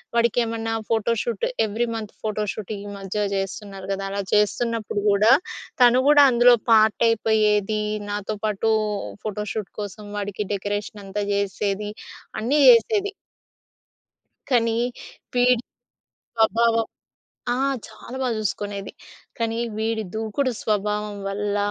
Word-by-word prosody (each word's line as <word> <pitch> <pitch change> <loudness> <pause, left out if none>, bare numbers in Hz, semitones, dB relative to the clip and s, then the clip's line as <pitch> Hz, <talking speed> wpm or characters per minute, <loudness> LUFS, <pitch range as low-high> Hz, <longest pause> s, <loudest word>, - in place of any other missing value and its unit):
వాడికేమన్నా 230 -1 +1 0.2
photo 225 0 +2
shoot 230 -4 -2 0.2
every 220 +3 -1
month 215 -2 -6
photo 215 -1 -1
shooting 210 -1 -6
ఈ - - -6
మధ్య 200 +2 -2
చేస్తున్నారు 195 0 -5
కదా! 195 0 -2
అలా 200 0 -2
చేస్తున్నప్పుడు 215 0 +1
కూడా, 210 +3 +5 0.5
తను 245 +1 +6
కూడా 295 -1 +8
అందులో 240 0 +6 0.2
పార్టయిపోయేది. 215 -1 +3 0.3
నాతో 205 +1 -3
పాటు 215 +1 +1 0.5
ఫోటో 210 0 -3
షూట్ 215 -3 -4
కోసం 205 +1 -7
వాడికి 205 0 -3
డెకరేషన్ 205 +1 -4
అంతా 205 +2 -3
చేసేది. 200 +1 -1 0.5
అన్నీ 255 +7 +1
చేసేది. 400 - +4 1.4
కానీ, 230 -2 +3 0.6
వీడి 245 -1 +4 0.7
స్వభావం 230 0 +3 0.7
ఆ! - - 0 0.3
చాలా 250 - -11
బాగా 250 -3 0
చూసుకునేది. 205 -1 -3 0.5
కానీ 230 -1 -1 0.2
వీడి 220 0 -1
దూకుడు 225 +5 -1
స్వభావం 210 0 -1
వల్ల 205 +1 -2
215 Hz, 115 wpm, -23 LUFS, 205-230 Hz, 1.4 s, కూడా